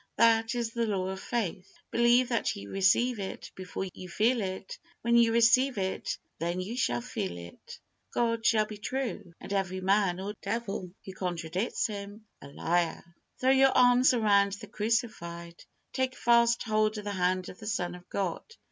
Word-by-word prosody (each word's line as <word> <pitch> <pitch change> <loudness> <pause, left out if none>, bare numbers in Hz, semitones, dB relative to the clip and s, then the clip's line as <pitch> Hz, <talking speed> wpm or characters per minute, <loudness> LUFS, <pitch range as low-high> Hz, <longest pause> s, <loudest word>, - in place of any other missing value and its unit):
That 225 0 +4
is 235 -2 -2
the 235 -1 -1
law 190 -3 -1
of 190 0 -5
faith. 190 -6 -3 0.2
Believe 240 +1 +4
that 235 -2 0
ye 100 - -8
receive 205 - +2
it 195 - -6
before 185 0 -5
you 185 - -9
feel 225 +6 +2
it; 190 0 -5 0.2
when 235 +1 +3
you 235 -1 +5
receive 235 +3 +4
it 190 -1 -2 0.2
then 170 +2 -2
you 195 +6 -4
shall 120 - 0
feel 90 -6 -4
it. 85 0 -11 0.3
God 230 -1 0
shall 215 -1 +4
be 210 -1 -9
true, 225 -7 -4
and - - -6
every 190 -1 -1
man 190 -1 +2
or 200 +2 -4
devil 210 -5 -3 0.2
who 190 - -7
contradicts 180 +3 -2
Him, 205 0 -6 0.2
a - - -10
liar. 170 +3 -1 0.4
Throw 260 +1 +3
your 270 0 +5
arms 250 0 +6
around 200 -3 +3
the 205 - -7
Crucified. 170 -7 -3 0.3
Take 260 0 -1
fast 235 0 +3
hold 215 -1 +1
of 210 - -5
the 205 - -3
hand 185 -1 0
of - - -11
the 215 - -8
Son 180 -5 -1
of 180 0 -13
God. 190 -4 -2
205 Hz, 175 wpm, -29 LUFS, 185-235 Hz, 0.4 s, arms